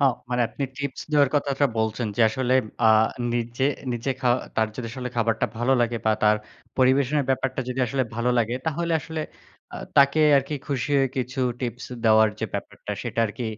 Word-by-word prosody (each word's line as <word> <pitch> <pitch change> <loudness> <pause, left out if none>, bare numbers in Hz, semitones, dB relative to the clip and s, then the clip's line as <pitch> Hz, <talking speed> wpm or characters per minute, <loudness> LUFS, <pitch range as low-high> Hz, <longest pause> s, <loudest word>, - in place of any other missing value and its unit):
এ্যাঁও 135 -3 +4 0.2
মানে 125 0 0
আপনি 140 - -4
টিপস 140 -2 -4
দেওয়ার 145 -3 +5
কথাটা 140 0 +1
বলছেন, 110 +2 -1
যে - - 0
আসলে 130 +2 0 0.3
আ - - +7 0.4
নিজে 120 +2 -1 0.3
নিজে, 120 +3 -2
খাওয়া 125 -1 +3 0.2
তার 110 -1 +2
যদি 125 - -4
আসলে 125 0 -5
খাবারটা 115 +1 +1
ভালো 120 +3 +2
লাগে 120 0 +1
বা 110 - +5
তার 105 0 +5 0.4
পরিবেশনের 135 +2 +3
ব্যাপারটা 130 0 -1
যদি 125 +1 -2
আসলে 130 +3 0
ভালো 120 +1 +1
লাগে 120 +1 +1
তাহলে 170 +2 -1
আসলে 160 +1 -5 0.5
আ - - -5 0.2
তাকে 140 +2 +5 0.2
আর 135 - +3
কি 150 - -2
খুশি 140 -1 -2
হয়ে 135 -1 +2
কিছু 125 0 -2 0.2
টিপস 120 -1 -4 0.2
দেওয়ার 110 0 +6
যে - - 0
ব্যাপারটা 100 +1 -5
সেটা 115 -2 -2
আরকি 110 +3 -6
125 Hz, 185 wpm, -24 LUFS, 115-140 Hz, 0.5 s, আ